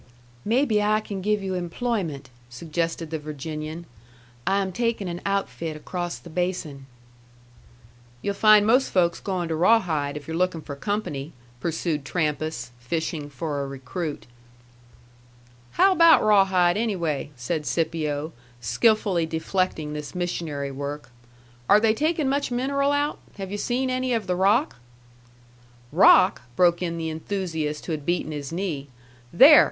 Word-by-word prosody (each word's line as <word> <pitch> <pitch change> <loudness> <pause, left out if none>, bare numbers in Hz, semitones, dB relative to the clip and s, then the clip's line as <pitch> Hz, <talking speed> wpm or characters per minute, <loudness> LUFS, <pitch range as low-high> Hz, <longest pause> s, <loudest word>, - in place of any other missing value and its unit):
"Maybe 230 -1 +2
I 210 +1 +3
can 200 -3 -6
give 210 +1 0
you 190 -1 -2
employment," 175 - -3 0.2
suggested 165 +5 -3
the 160 - -2
Virginian. 155 +2 -6 0.6
"I 195 +1 +3
am 190 -1 -1
taking 230 -1 -1
an 175 0 -5
outfit 165 -6 -2
across 175 +2 -4
the - - -14
basin." 160 -6 -3 1.4
"You'll 200 - 0
find 210 0 +6
most 250 +5 +4
folks 170 -2 +2
going 185 -3 -2
to 160 - 0
Rawhide, 160 -6 +2
if 145 -1 -10
you're 160 - -4
looking 180 -1 0
for 140 - -7
company," 150 -4 -3 0.3
pursued 160 0 -2
Trampas, 150 -4 -2
fishing 150 +3 -3
for 145 0 -3
a 140 - -3
recruit. 140 +4 -5 1.5
"How 390 - +5
about 335 -3 +6
Rawhide, 190 -4 +4
anyway?" 170 -11 -1
said 150 +5 -3
Scipio, 155 -2 -1 0.3
skillfully 175 - +2
deflecting 160 -1 -1
this 150 +1 -6
missionary 160 -6 -3
work. 140 0 -6 0.6
"Are 205 - +7
they 220 0 +3
taking 310 +3 0
much 280 +1 0
mineral 275 +3 0
out? 290 +1 0 0.2
Have 195 -1 -6
yu' 205 - -3
seen 255 +3 -1
any 255 0 0
of 225 -3 -1
the 180 - 0
rock?" 205 - +2 1.1
"Rock?" 185 +1 +6
broke 175 -1 +3
in 170 -2 -2
the 160 -1 -3
enthusiast 160 -3 -3
who - - -4
had 155 -2 -3
beaten 170 -1 -1
his 145 -1 -5
knee. 165 -6 -3 0.4
"There!" 285 - +9
175 Hz, 140 wpm, -25 LUFS, 150-205 Hz, 1.5 s, There